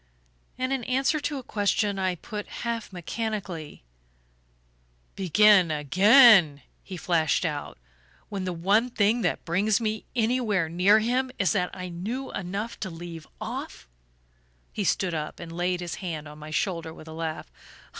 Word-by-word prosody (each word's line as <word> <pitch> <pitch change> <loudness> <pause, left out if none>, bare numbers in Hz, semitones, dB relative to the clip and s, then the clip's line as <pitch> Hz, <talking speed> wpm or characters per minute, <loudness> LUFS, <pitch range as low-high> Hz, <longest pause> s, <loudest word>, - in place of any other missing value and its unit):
And, 255 +1 -1
in 265 -3 -2
answer 270 +4 +1
to 290 0 -3
a 265 - -6
question 205 -2 0
I 185 -1 0
put 210 +4 -7 0.2
half 230 -3 -3
mechanically 185 - -5 1.3
"Begin 195 0 +5
again?" 180 - +6 0.2
he 185 - -8
flashed 170 0 +1
out. 150 -3 -4 0.5
"When 200 -2 -4
the 185 - -2
one 200 +8 +2
thing 225 +1 +2
that 180 - -1
brings 200 +5 +2
me 220 -2 -2
anywhere 220 -7 +1
near 180 +5 +5
him 250 +4 0
is 195 - +2
that 180 -4 0
I 185 -1 -6
knew 215 +10 -5
enough 195 +5 -4
to 190 - -4
leave 165 -1 -9
off?" - - -6 0.9
He 210 - -2
stood 185 -1 0
up 155 -1 -4
and 170 -1 -8
laid 175 +1 -1
his 175 -2 -4
hand 160 -5 -5
on 150 +1 -11
my 155 0 -9
shoulder 160 0 -2
with 155 - -13
a 160 - -8
laugh. 160 - -5
190 Hz, 155 wpm, -26 LUFS, 165-220 Hz, 1.3 s, again